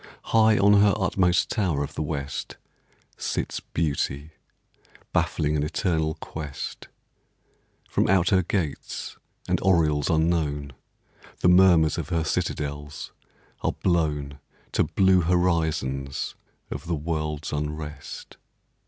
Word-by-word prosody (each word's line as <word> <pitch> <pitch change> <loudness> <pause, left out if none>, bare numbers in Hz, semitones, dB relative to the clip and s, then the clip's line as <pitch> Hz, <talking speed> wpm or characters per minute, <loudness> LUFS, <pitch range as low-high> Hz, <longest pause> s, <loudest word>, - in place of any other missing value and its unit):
High 110 -1 +6
on 100 0 +6
her 105 0 +5
utmost 95 -3 +2
tower 90 -10 0
of 70 +1 -6
the - - -4
West 70 -3 -4 0.6
Sits - - -2
Beauty, 75 -1 -2 0.8
baffling 75 0 +1
an 75 - +1
eternal 80 0 0
quest; 75 -3 -7 1.0
From - - +1
out 95 -2 +4
her 95 -1 +5
gates 85 -5 -3 0.3
and - - +1
oriels 80 -6 +3
unknown 80 -4 0 0.7
The 90 - +5
murmurs 90 -4 +5
of - - -5
her 85 -2 +1
citadels 75 -1 -3 0.5
are - - 0
blown 75 -5 0 0.3
To - - +2
blue 95 -1 +4
horizons 80 -6 0 0.4
of - - -6
the 85 - 0
world's 75 -1 -3
unrest. 75 +1 -5
80 Hz, 110 wpm, -25 LUFS, 75-90 Hz, 1.0 s, High